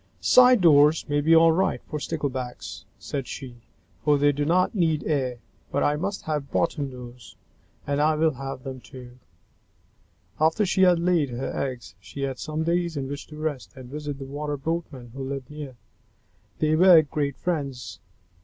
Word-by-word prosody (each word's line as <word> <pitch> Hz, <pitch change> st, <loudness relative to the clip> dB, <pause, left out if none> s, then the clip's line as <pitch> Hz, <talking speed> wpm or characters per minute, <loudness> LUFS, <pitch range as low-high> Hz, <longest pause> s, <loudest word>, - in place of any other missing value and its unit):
"Side 250 Hz, -3 st, +6 dB
doors 150 Hz, -1 st, +5 dB
may 145 Hz, -1 st, +1 dB
be 160 Hz, +3 st, +5 dB
all 165 Hz, 0 st, +6 dB
right 185 Hz, +4 st, +1 dB
for 150 Hz, -, -5 dB
Sticklebacks," 130 Hz, -, -5 dB
said 125 Hz, +6 st, -5 dB
she, 125 Hz, -3 st, -8 dB, 0.5 s
"for 150 Hz, -1 st, +4 dB
they 145 Hz, +1 st, +4 dB
do 145 Hz, +1 st, -2 dB
not 180 Hz, +4 st, +2 dB
need 165 Hz, -7 st, +1 dB
air, 130 Hz, -5 st, -1 dB, 0.3 s
but -, -, 0 dB
I 145 Hz, -, +2 dB
must 195 Hz, +6 st, -3 dB
have 150 Hz, -3 st, -3 dB
bottom 150 Hz, -4 st, 0 dB
doors, 125 Hz, -2 st, -11 dB, 0.5 s
and 145 Hz, +1 st, 0 dB
I 155 Hz, +1 st, +3 dB
will 160 Hz, +1 st, +2 dB
have 135 Hz, -1 st, -7 dB
them 130 Hz, -1 st, -6 dB
too!" 125 Hz, +1 st, -13 dB, 1.2 s
After 160 Hz, +7 st, +3 dB
she 190 Hz, 0 st, +1 dB
had 180 Hz, -2 st, +6 dB
laid 170 Hz, -4 st, +1 dB
her 125 Hz, +2 st, -4 dB
eggs, 125 Hz, -4 st, -4 dB
she 140 Hz, -, -9 dB
had 135 Hz, -2 st, -3 dB
some 155 Hz, 0 st, -3 dB
days 170 Hz, -1 st, 0 dB
in 135 Hz, -1 st, -3 dB
which 145 Hz, 0 st, -6 dB
to 150 Hz, -, -11 dB
rest 155 Hz, -4 st, -4 dB
and 130 Hz, -1 st, -11 dB
visit 145 Hz, -1 st, -5 dB
with 135 Hz, -1 st, -8 dB
the 135 Hz, -, -11 dB
Water 145 Hz, 0 st, -3 dB
Boatmen 140 Hz, -5 st, -4 dB
who 135 Hz, 0 st, -6 dB
lived 135 Hz, 0 st, -5 dB
near. 145 Hz, -4 st, -8 dB, 0.8 s
They 155 Hz, 0 st, +2 dB
were 175 Hz, -1 st, +7 dB
great 145 Hz, -2 st, -3 dB
friends. 140 Hz, -7 st, -4 dB
145 Hz, 180 wpm, -25 LUFS, 135-160 Hz, 1.2 s, were